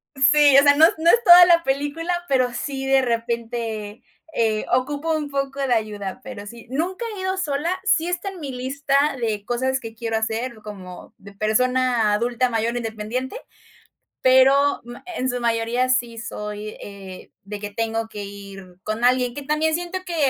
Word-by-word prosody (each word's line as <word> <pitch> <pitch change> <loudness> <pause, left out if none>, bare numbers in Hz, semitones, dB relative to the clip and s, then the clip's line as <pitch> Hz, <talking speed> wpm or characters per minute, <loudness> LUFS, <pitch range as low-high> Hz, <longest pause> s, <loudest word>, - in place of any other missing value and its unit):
Sí, 285 +1 +5
o - - +4
sea, 285 0 +6
no 315 +2 +7
no 335 +1 +3
es 470 +4 +5
toda 355 -2 +10
la 340 -1 +4
película, 290 +6 -2
pero 255 -3 +1
sí, 270 +1 -4
de 270 0 +4
repente, 230 -2 -3 0.3
eh, 220 -2 +1
ocupo 290 +5 0
un 295 -2 -4
poco 275 0 -3
de 250 - +1
ayuda, 210 0 -3
pero 230 -6 -8
sí, 235 +2 -11
nunca 355 - -2
he - - -5
ido 375 0 -1
sola, 335 +3 -1
sí 345 -5 +2
está 355 +2 -3
en 380 - -10
mi 280 -4 -5
lista 275 +2 -2 0.2
de 215 -3 -2
cosas 260 +3 -1
que 225 -2 -9
quiero 225 -1 -3
hacer, 225 +2 -3
como 185 -4 -10
de 200 0 -14
persona 235 +1 +1
adulta 240 +3 0
mayor, 230 +2 -1
independiente, 230 - -4 0.8
pero 270 +2 +5
mm 240 0 -9 0.2
en 260 0 -1
su 245 - -2
mayoría 235 +2 0
sí 240 -2 0
soy, 210 -1 -6
eh, 195 -2 -10
de 205 +1 -7
que 205 0 -5
tengo 225 +1 -2
que 205 -1 -7
ir 195 -2 -11
con 215 +2 -3
alguien. 250 -1 +2
Que 285 - -6
también 310 +2 0
siento 350 +2 -4
que, 345 -2 -4
250 Hz, 175 wpm, -22 LUFS, 220-285 Hz, 0.8 s, toda